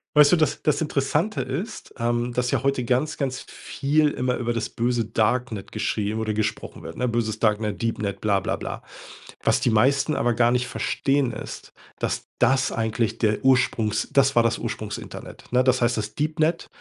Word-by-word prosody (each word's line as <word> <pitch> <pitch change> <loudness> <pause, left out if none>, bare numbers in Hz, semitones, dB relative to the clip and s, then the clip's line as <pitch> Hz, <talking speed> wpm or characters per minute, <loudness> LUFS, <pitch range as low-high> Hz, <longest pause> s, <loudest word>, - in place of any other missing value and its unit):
Weißt 150 -1 +7
du, - - +7
das 155 -3 0
das 150 0 +2
Interessante 150 +7 0
ist, 155 - -5
ähm, 120 +1 0
dass 125 0 0
ja - - 0
heute 135 -2 +1
ganz, 130 +6 0
ganz 130 -2 -2
viel 150 +2 0
immer 125 -2 -1
über 120 -1 -1
das 115 - -2
böse 120 -1 0
Darknet 110 -1 -1
geschrieben 105 +1 -1
oder 110 -1 -1
gesprochen 110 0 -3
wird, 80 0 -9
ne? 125 - 0
Böses 115 -2 -1
Darknet, 105 0 0
Deepnet, 105 -4 -2
bla 100 -2 +2
bla - - -2
bla. - - -6 0.6
Was - - +3
die - - +1
meisten 135 +7 +3
aber 120 +1 +1
gar 120 +1 +3
nicht 125 0 +1
verstehen, 135 -3 0
ist, - - -8 0.3
dass - - -2
das 130 +1 +3
eigentlich 110 0 -1
der 105 0 0
Ursprungs 125 -5 +2
das 140 -1 +3
war 120 - +5
das 115 - +1
Ursprungsinternet, - - -6
ne? 125 +1 +4
Das 130 -1 +2
heißt, 120 0 +2
das 105 0 -4
Deepnet, 155 +2 0
125 Hz, 180 wpm, -24 LUFS, 110-135 Hz, 0.6 s, Weißt